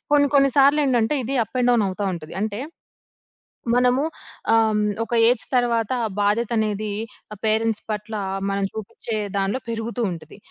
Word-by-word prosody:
కొన్ని 285 -1 +5
కొన్ని 275 0 +5
సార్లెంటంటే, 275 -2 +4
ఇది 270 - -2
అప్ 220 - -10
అండ్ 245 0 +3
డౌన్ 230 -3 +3
అవుతా 195 +2 -4
ఉంటుంది. 155 -2 -9
అంటే 215 0 -3 1.1
మనము 250 +2 +3 0.5
ఆ! - - +6 0.2
హ్మ్. 210 - +1 0.2
ఒక 230 - -14 0.2
ఏజ్ 245 -1 +2
తరువాత 235 -2 +1 0.3
బాధ్యతనేది 215 0 0 0.4
ఆ - - -13
పేరెంట్స్ 220 0 +1
పట్ల 210 +1 -4 0.4
మనం 195 0 -1
చూపించే 220 +1 -5 0.2
దాంట్లో 195 +5 0
పెరుగుతూ 230 +1 -3
ఉంటది. 165 0 -9
225 Hz, 145 wpm, -23 LUFS, 210-245 Hz, 1.1 s, ఆ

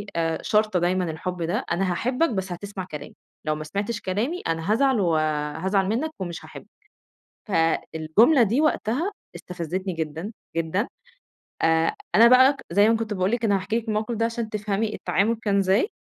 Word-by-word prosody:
آآ، 165 -1 0
شارطة 215 -3 +2
دايمًا 180 -1 0
الحب 180 +3 -5
ده، 170 - -1
أنا 185 +1 +1
هاحبك 250 - +1
بس 190 -4 -3
هتسمع 190 +1 -6
كلامي، 150 - -8 0.3
لو 155 - 0
ما 155 - -6
سمعتش 205 +8 -3
كلامي 230 - -2
أنا 165 +4 -1
هازعل 265 +1 +3
و 170 -5 +2 0.5
هازعل 190 0 +1
منك 275 +9 -1
ومش 170 -4 -5
هاحبك، 160 - -11 0.8
فالجملة 165 - +3
دي 230 +7 +2
وقتها 310 - 0 0.2
استفزتني 180 +2 -4
جدًا، 160 +5 -4 0.2
جدًا. 165 +7 0 0.8
آآ، 165 0 +3 0.2
أنا 230 +2 +8
بقى 260 +3 +6
زي 205 +4 +4
ما 225 - +4
كنت 220 -2 -3
باقول 185 0 0
لِك 235 0 -1
أنا 205 -3 +3
هاحكي 195 +4 -1
لِك 230 -1 -7
الموقف 215 +2 -1
ده 225 +1 0
عشان 230 -1 -3
تفهمي 210 0 -2
التعامل 220 +4 0
كان 200 -2 +1
إزاي، 195 - +2
200 Hz, 170 wpm, -24 LUFS, 175-225 Hz, 0.8 s, أنا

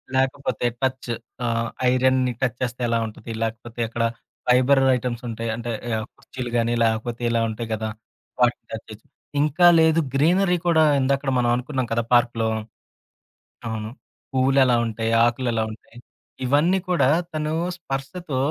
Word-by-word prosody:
లేకపోతే 130 -2 0 0.2
టచ్ 130 -1 -1 0.4
ఆహ్, 115 -1 0 0.2
ఐరన్‌ని 130 0 +2
టచ్ 125 -4 0
చేస్తే 125 0 -3
ఎలా 115 0 +2
ఉంటది? 110 +1 -9
లేకపోతే 115 +1 -5
ఎక్కడ 115 +1 -2 0.4
ఫైబర్ 130 +2 +5
ఐటెమ్స్ 125 -1 -3
ఉంటాయి. 115 0 -4
అంటే 120 +1 -4 0.3
ఆహ్, 110 - -4
కుర్చీలు 125 -2 -7
గానీ, 115 0 +1
లేకపోతే 115 +1 -1
ఇలా 115 0 +1
ఉంటాయి 115 +1 -5
గదా! 110 0 -2 0.5
వాటిని 120 -1 +2
టచ్ 110 - -6
చేస్తూ, 110 0 -12 0.3
ఇంకా 155 +4 +4
లేదు 160 0 +4 0.2
గ్రీనరీ 180 +5 +3
కూడా 160 -2 +5 0.2
ఎందాక్కడ 135 +1 +1
మనం 120 -1 +2
అనుకున్నాం 125 0 -2
కదా 115 - +1
పార్కులో, 120 -2 +3 1.2
అవును. 110 -1 -4 0.4
పువ్వులేలా 130 -1 +4
ఉంటాయి, 115 +1 -2
ఆకులేలా 120 -1 0
ఉంటాయి. 115 +1 -17 0.5
ఇవన్నీ 150 +8 +3
కూడా 170 -7 +3 0.2
తను 155 0 -2 0.3
స్పర్శతో 135 +1 -4
125 Hz, 135 wpm, -23 LUFS, 115-135 Hz, 1.2 s, ఫైబర్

